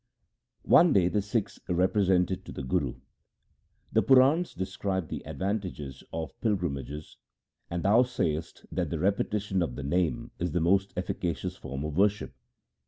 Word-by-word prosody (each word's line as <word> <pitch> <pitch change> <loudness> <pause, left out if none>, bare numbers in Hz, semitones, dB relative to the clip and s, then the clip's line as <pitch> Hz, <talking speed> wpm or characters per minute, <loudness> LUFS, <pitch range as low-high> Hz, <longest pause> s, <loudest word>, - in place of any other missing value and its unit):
One 170 -4 +6
day 90 -2 +4
the 105 - +1
Sikhs 105 +1 -2
represented 95 0 +2
to - - -8
the - - -6
Guru: 65 - 0 0.5
' - - -42
The - - +5
Purans 135 +7 +4
describe 95 -2 -2
the - - -5
advantages 90 - -4
of 80 -1 -6
pilgrimages, 75 - -2 0.5
and 85 -1 -3
thou 105 +5 +5
sayest 80 -11 -2
that - - -1
the - - -2
repetition 100 0 0
of 70 -8 -2
the 70 - -5
Name 90 - 0
is 85 -2 -2
the 90 - +2
most 95 +4 +2
efficacious 90 -2 -2
form 70 +1 -6
of 75 -1 -4
worship. 105 +2 +2
95 Hz, 150 wpm, -28 LUFS, 80-105 Hz, 0.5 s, One